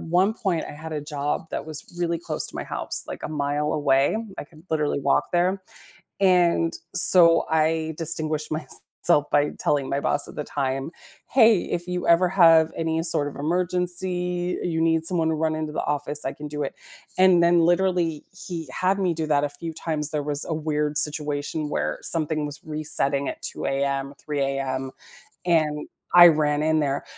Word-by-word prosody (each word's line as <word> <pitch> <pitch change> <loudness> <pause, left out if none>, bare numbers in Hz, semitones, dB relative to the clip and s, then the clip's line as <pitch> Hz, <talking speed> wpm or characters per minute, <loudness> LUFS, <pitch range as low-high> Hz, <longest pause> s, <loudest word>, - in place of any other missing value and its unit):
one 185 +6 +2
point, 190 -8 -1
I - - -7
had 160 +2 -8
a 150 - -2
job 145 +2 -3
that - - -4
was 155 -2 -6
really 170 -1 0
close - - -4
to - - -14
my - - -4
house, - - -3
like, - - -7
a - - -4
mile 150 0 -1
away- 140 +3 +2 0.2
I - - -4
could 155 +2 -19
literally 150 -2 0
walk - - +1
there- 185 +2 +1 0.6
and 175 -3 +3 0.2
so 170 -2 +5
I 160 0 +1
distinguished 155 -2 -2
myself 155 0 -1
by 145 0 +3
telling 140 -2 0
my 140 - -1
boss 145 0 0
at - - -11
the 150 - -3
time, 135 +2 -3 0.4
"Hey, 225 -7 +5
if 175 +1 -4
you 180 -1 -3
ever 170 +2 +5
have 165 -3 +5
any 160 0 -1
sort 150 -4 +1
of - - -11
emergency, 180 +2 -1
you 165 -2 -1
need 165 0 +2
someone 165 -2 0
to 160 - 0
run 155 0 0
into 155 -1 -3
the - - -3
office, 145 0 -3
I 135 - -2
can 150 0 -8
do 150 0 -3
it." 135 - -5 0.4
And 185 -2 +6
then 170 0 +4
literally, 175 -2 +1
he 170 -4 -7
had 190 +2 0
me 180 -3 +1
do 160 -1 -3
that 145 -1 +2
a 145 - -3
few 160 +3 -7
times, 155 -2 -2
there 150 -2 -2
was 145 0 -2
a 160 - -3
weird 150 -1 -1
situation 150 0 -2
where - - -2
something 155 -2 0
was 145 0 -7
resetting 150 -2 -1
at - - -7
2 - - -5
AM, 135 0 -1
3 145 -2 -3
AM, 135 -1 -2 0.5
and 155 -4 +1 0.3
I 175 -1 +11
ran 150 -1 +2
in 155 0 +2
there; 140 -1 -1
155 Hz, 190 wpm, -24 LUFS, 145-170 Hz, 0.6 s, I